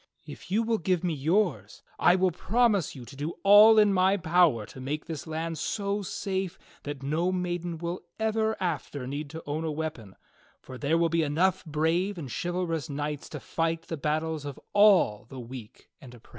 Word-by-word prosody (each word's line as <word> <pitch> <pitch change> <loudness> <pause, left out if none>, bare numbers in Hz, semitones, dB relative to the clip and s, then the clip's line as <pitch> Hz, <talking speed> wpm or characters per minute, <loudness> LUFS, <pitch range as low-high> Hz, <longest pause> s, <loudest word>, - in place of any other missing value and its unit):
If - - -11
you 215 +5 +2
will 225 -1 0
give 180 0 0
me 175 -2 0
yours 150 - 0 0.2
I 180 - +5
will 185 0 +2
promise 205 - +1
you 125 -3 -9
to 135 - -12
do 145 +4 -4
all 210 +2 +8
in 210 -2 +5
my 190 +1 +3
power 165 - +3
to 130 - -11
make 150 +4 -4
this 160 -1 -6
land 160 0 -3
so 200 +3 -2
safe 190 -1 -3 0.2
that 145 -2 -6
no 160 +6 0
maiden 175 -2 -3
will 170 +2 -4 0.2
ever 220 0 0
after 150 -6 -3
need 145 +3 -5
to 160 +2 -8
own 150 +2 -3
a 160 - -2
weapon, 150 -11 -5 0.4
for 130 -1 -11
there 150 +3 +1
will 165 0 +2
be 165 0 +1
enough 160 +5 +1
brave 165 +6 0
and 145 -6 -6
chival 175 - -2
rous 160 -5 -3
knights 145 0 -4
to 150 - -6
fight 165 +3 -2
the 165 - -2
battles 155 +1 -2
of 145 -2 -7
all 200 - +5
the 135 - -8
weak 120 -2 -10
and 125 -2 -12
the - - -12
oppressed." 115 - -22
165 Hz, 200 wpm, -28 LUFS, 145-185 Hz, 0.4 s, all